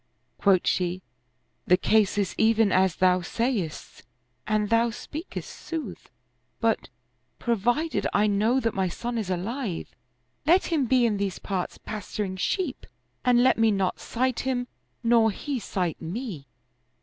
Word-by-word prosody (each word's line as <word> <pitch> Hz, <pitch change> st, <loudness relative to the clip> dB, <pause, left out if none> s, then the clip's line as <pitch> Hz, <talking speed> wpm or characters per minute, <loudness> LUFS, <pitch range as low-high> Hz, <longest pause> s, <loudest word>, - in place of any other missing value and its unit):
Quoth 195 Hz, -3 st, +4 dB
she, 180 Hz, 0 st, 0 dB, 0.3 s
" 125 Hz, -, -45 dB
The 180 Hz, -, +6 dB
case 210 Hz, +1 st, +2 dB
is 200 Hz, -3 st, 0 dB
even 220 Hz, -2 st, +3 dB
as 185 Hz, -2 st, +3 dB
thou 185 Hz, 0 st, +3 dB
sayest 205 Hz, -4 st, -3 dB, 0.5 s
and 215 Hz, 0 st, 0 dB
thou 230 Hz, +1 st, +4 dB
speakest 305 Hz, -, -7 dB
sooth; 325 Hz, -2 st, -6 dB, 0.5 s
but, -, -, 0 dB, 0.5 s
pro 235 Hz, -1 st, 0 dB
vided 245 Hz, +10 st, 0 dB
I 205 Hz, -, +3 dB
know 215 Hz, +5 st, +2 dB
that 230 Hz, -3 st, 0 dB
my 190 Hz, -1 st, 0 dB
son 235 Hz, +6 st, -3 dB
is 205 Hz, -4 st, -4 dB
alive, 195 Hz, +2 st, -3 dB, 0.5 s
let 345 Hz, +5 st, +3 dB
him 285 Hz, -6 st, +2 dB
be 250 Hz, 0 st, +4 dB
in 215 Hz, -3 st, +1 dB
these 195 Hz, -2 st, -2 dB
parts 190 Hz, -3 st, -3 dB
pasturing 205 Hz, -2 st, -4 dB
sheep 330 Hz, -, -2 dB, 0.4 s
and 245 Hz, -1 st, +4 dB
let 260 Hz, -, +4 dB
me 225 Hz, 0 st, +5 dB
not 195 Hz, -3 st, 0 dB
sight 255 Hz, +1 st, -1 dB
him 250 Hz, -1 st, -1 dB, 0.4 s
nor 230 Hz, -1 st, +5 dB
he 265 Hz, +6 st, -3 dB
sight 180 Hz, -5 st, -2 dB
me." 175 Hz, -, -5 dB
220 Hz, 150 wpm, -26 LUFS, 190-245 Hz, 0.5 s, The